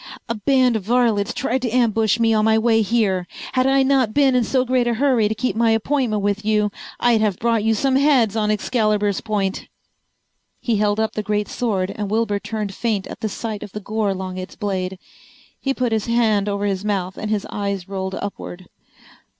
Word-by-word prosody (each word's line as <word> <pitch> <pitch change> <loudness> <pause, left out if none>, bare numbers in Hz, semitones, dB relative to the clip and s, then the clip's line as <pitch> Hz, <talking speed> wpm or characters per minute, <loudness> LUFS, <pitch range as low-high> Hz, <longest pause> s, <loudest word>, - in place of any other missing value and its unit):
"A 230 - -1
band 250 +2 +2
of 220 - -1
varlets 225 0 +1
tried 250 +1 -1
to 245 - -1
ambush 225 -2 +2
me 225 -1 +3
on 215 -1 +2
my 220 0 +4
way 225 0 +3
here. 195 -4 +1 0.3
Had 255 0 +2
I 270 0 +4
not 265 -5 +2
been 275 -2 +4
in 250 -1 +3
so 255 +2 +1
great 250 -1 +1
a 235 - +1
hurry 250 -4 +2
to 220 - -2
keep 255 +2 -2
my 230 0 +3
appointment 225 -1 0
with 205 +1 0
you 210 -1 +1 0.3
I'd 235 -3 +3
have 205 -4 +1
brought 230 -2 +1
you 225 0 +2
some 265 +4 +2
heads 265 -7 +3
on 215 -1 0
Excalibur's 210 -2 0
point." 200 -4 -2 0.9
He 230 -3 0
held 205 0 +1
up 220 0 0
the 215 - -2
great 210 0 -1
sword 195 -6 -1
and 205 -2 -4
Wilbur 215 -1 0
turned 210 0 -4
faint 215 -2 -1
at - - -9
the 220 - -2
sight 215 0 -5
of 200 - -9
the 210 - -4
gore 210 0 -1
along 185 -1 -4
its 185 - -8
blade. 190 -2 -3 0.6
He 270 - -1
put 255 -3 -1
his 220 0 -1
hand 220 -4 +2
over 200 0 -2
his 195 -1 -1
mouth 190 -3 -2
and 215 - -5
his 210 -2 -1
eyes 200 -2 -3
rolled 190 -1 -4
upward. 185 -2 -7
215 Hz, 205 wpm, -21 LUFS, 205-235 Hz, 0.9 s, my